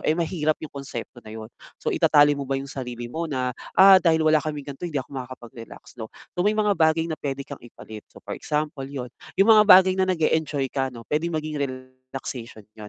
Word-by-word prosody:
eh, 155 - 0
mahirap 160 -3 0
'yong - - -10
konsepto 140 -3 -8
na 110 - -15
'yon. 110 +1 -9 0.2
So - - -3
itatali 145 0 +4
mo 140 -2 -5
ba 135 - 0
'yong 135 0 -6
sarili 120 -3 -6
mo 165 0 -3
na, 130 -3 -2 0.2
"Ah, 190 0 +8
dahil 160 -2 +2
wala 155 -1 +4
kaming 150 -2 -5
ganito 155 +6 -6
hindi 155 - -5
ako 135 0 -4
makakapag-relax, 125 -1 -12
'no." 110 - -6 0.2
So 180 - -4
may 210 +3 +2
mga 210 -1 +2
bagay 160 -2 +2
na 160 -2 -5
puwede 140 -1 -4
kang 140 - -10
ipalit. 110 -2 -11
So - - -18
for - - -6
example, 150 -2 -3
'yon, 125 -3 -7 0.2
'yong 200 +4 +6
mga 215 -1 +7
bagay 185 0 +8
na 190 - +1
nag-e-enjoy 155 -5 0
ka, 135 -1 -1
'no 120 -3 -11
puwedeng 160 +2 -2
maging 155 -1 -4
relaxation 130 -3 -7
'yon. 105 -1 -11
145 Hz, 215 wpm, -24 LUFS, 130-160 Hz, 0.2 s, Ah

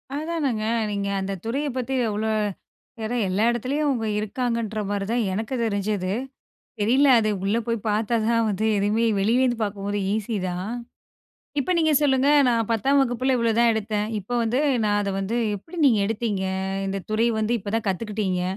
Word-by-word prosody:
அதானங்க 295 -7 -1 0.3
நீங்க 200 -1 -2
அந்த 195 +1 -3
துறைய 275 +6 -1
பத்தி 260 +1 -2 0.2
அவ்ளோ, 215 +1 -1 0.7
ஏன்னா 225 +3 -2
எல்லா 195 +4 +1
இடத்துலயும் 260 +6 -1
அவங்க 240 -5 0
இருக்காங்கன்ற 220 0 -2
மாதிரி 200 -1 -1
தான் 235 0 +1
எனக்கு 220 +6 -3
தெரிஞ்சது. 200 -3 -1 0.7
தெரியல 255 +7 +4
அது 215 -1 +1
உள்ளே 210 +4 +1
போய் 230 -1 0
பார்த்தா 215 +2 +1
தான் 230 -1 +3
வந்து 210 +1 0
எதுவுமே 210 +3 +1
வெளியிலேருந்து 240 +4 +2
பார்க்கும்போது 205 0 -2 0.2
ஈஸி 220 +1 -2
தான். 180 +3 -4 0.9
இப்ப 280 - -1
நீங்க 315 -2 +3
சொல்லுங்க 270 -2 +3 0.2
நான் 230 -3 +1
10 270 +5 +3
வகுப்பில் 255 +1 +1
இவ்ளோதான் 235 0 +3
எடுத்தேன். 215 -1 -1
இப்போ 205 +5 -7
வந்து 235 +3 +1 0.2
நான் 205 -1 +2
அதை 200 -1 -2
வந்து 200 +5 -2 0.2
எப்படி 325 - -11
நீங்க 235 -6 +5
எடுத்தீங்க? 210 -2 -1 0.4
இந்த 195 0 -3
துறை 220 +2 +2
வந்து 220 +2 0
இப்போ 200 0 -6
தான் 225 - -1
கத்துக்கிட்டங்க, 195 -2 -1
220 Hz, 160 wpm, -24 LUFS, 205-245 Hz, 0.9 s, நீங்க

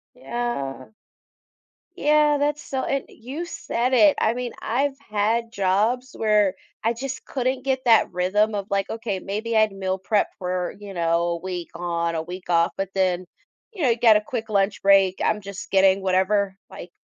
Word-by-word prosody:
Yeah. 235 - -4 1.1
Yeah, 300 -2 +3
that's 295 +1 0
so 265 -1 -3
and 275 -1 -1
you 270 +9 -7
said 250 -6 -2
it, 295 +4 +6
I 220 - +3
mean, 245 0 -4
I've 270 +4 0
had 225 +3 0
jobs 215 +6 0
where 210 -3 +3 0.3
I 230 +2 +2
just 265 +2 -6
couldn't 255 0 -2
get 260 -1 -1
that 230 -2 +5
rhythm 205 +4 +1
of, 200 -1 -3
like, 195 -1 0
okay, 225 -4 -3
maybe 220 +4 -2
I'd 215 -1 +4
meal 190 -1 -2
prep 200 +2 +1
for, 180 -1 -3
you 200 -1 -9
know, 170 -1 +1
a 170 - -1
week 180 -1 -5
on, 170 -1 -2
a 160 - -1
week 180 +2 -9
off, 170 -1 +3
but 195 -1 -2
then, 185 -1 +1 0.5
you 375 - -7
know, 260 - +4
you 230 - +2
got 225 -3 +6
a 210 - +3
quick 225 0 -5
lunch 200 -1 +1
break, 195 -1 +4
I'm 210 - +1
just 195 0 -8
getting 195 0 +4
whatever, 190 +1 +1
like, 175 - -10
210 Hz, 180 wpm, -23 LUFS, 185-240 Hz, 1.1 s, it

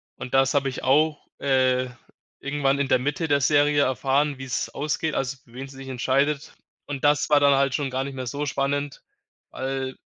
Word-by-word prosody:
Und 125 - -8
das 135 +1 +3
habe 140 -1 +2
ich 130 - -7
auch, 150 +3 +2
äh, 130 -2 +2 0.5
irgendwann 140 0 0
in 140 - +1
der - - +4
Mitte 145 +5 -2
der 140 -2 +2
Serie 145 +1 +4
erfahren, 135 +3 +1
wie's 135 -1 -3
ausgeht, 150 +1 -2
also, 135 0 -2
für 115 - -22
wen 135 +2 -7
sie 135 - -13
sich 135 0 -9
entscheidet 140 +3 0 0.3
und 140 -2 -5
das 145 +1 +3
war 150 - +6
dann 140 -1 +5
halt 135 -1 +2
schon 140 -3 -2
gar 130 +1 -1
nicht 135 0 -6
mehr 130 -1 -4
so 140 +5 -3
spannend, 140 0 -2 0.5
weil 130 0 -4
135 Hz, 195 wpm, -24 LUFS, 130-145 Hz, 0.5 s, war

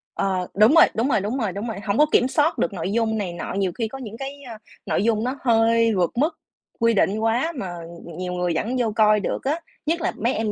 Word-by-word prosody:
Ờ, 185 -2 -1
đúng 215 - +5
rồi, 330 - +9
đúng 235 +5 +1
rồi, - - +3
đúng 215 +7 -2
rồi, 220 -7 -1
đúng 205 +5 -4
rồi, 220 -4 -5
hổng 200 +1 -2
có 300 - +6
kiểm 250 - +4
soát 295 +5 +1
được 175 - 0
nội 185 +1 -3
dung 220 0 0
này 190 -5 -3
nọ, 170 - -5
nhiều 195 -2 0
khi 230 - -2
có 270 - -8
những 225 -4 -8
cái, 275 +2 -7
a, 235 -4 -9 0.3
nội - - 0
dung 220 -1 +1
nó 255 +3 -2
hơi 230 -1 +3
vượt 180 -2 +1
mức 315 +5 +1 0.4
quy 230 0 +3
định 200 0 +2
quá 240 +9 +1
mà, 200 -8 -4
ừm, 170 0 -10
ừm, 170 -2 -10
nhiều 180 0 -4
người 180 -1 -1
vẫn 240 +4 -1
vô 230 -3 +1
coi 215 -1 +4
được - - -3
á, 300 +5 0 0.3
nhất 330 +2 0
là - - 0
mấy 235 +5 0
em 215 -1 -1
225 Hz, 270 wpm, -23 LUFS, 195-250 Hz, 0.4 s, rồi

